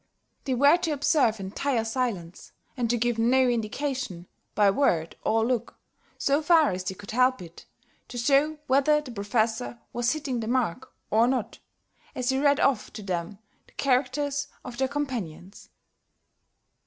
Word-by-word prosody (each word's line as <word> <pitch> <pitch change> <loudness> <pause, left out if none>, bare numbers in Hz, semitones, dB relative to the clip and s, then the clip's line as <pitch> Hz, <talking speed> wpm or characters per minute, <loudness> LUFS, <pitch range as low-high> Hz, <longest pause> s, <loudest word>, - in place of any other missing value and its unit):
They 260 - 0
were 285 +6 +6
to 350 -2 -2
observe 270 -6 +2
entire 225 +5 -1
silence, 225 -8 -4 0.2
and 240 -3 -1
to 240 - +2
give 235 0 0
no 255 +3 +4
indication, 240 -4 -2 0.3
by 205 -1 +5
word 170 - +1
or 225 0 +2
look, 240 -1 -2 0.4
so 280 +2 +1
far 320 -1 +4
as 185 0 -4
they 190 +1 -4
could 200 +1 -10
help 255 +2 +3
it, 170 -2 -12 0.4
to 245 - -8
show 285 +5 +2
whether 280 +3 +3
the 295 -4 -9
Professor 225 +2 -1 0.2
was 240 0 +1
hitting 280 -6 -3
the 220 - -4
mark 255 0 -1 0.2
or 225 +2 +4
not, 250 -4 -2 0.6
as 250 0 -1
he 265 0 +1
read 285 0 +3
off 275 -4 +1
to 210 -1 -8
them 180 0 -3 0.3
the - - -24
characters 280 +2 0 0.2
of 245 -1 -8
their 265 - +2
companions. 230 - -5
245 Hz, 155 wpm, -26 LUFS, 215-275 Hz, 0.6 s, were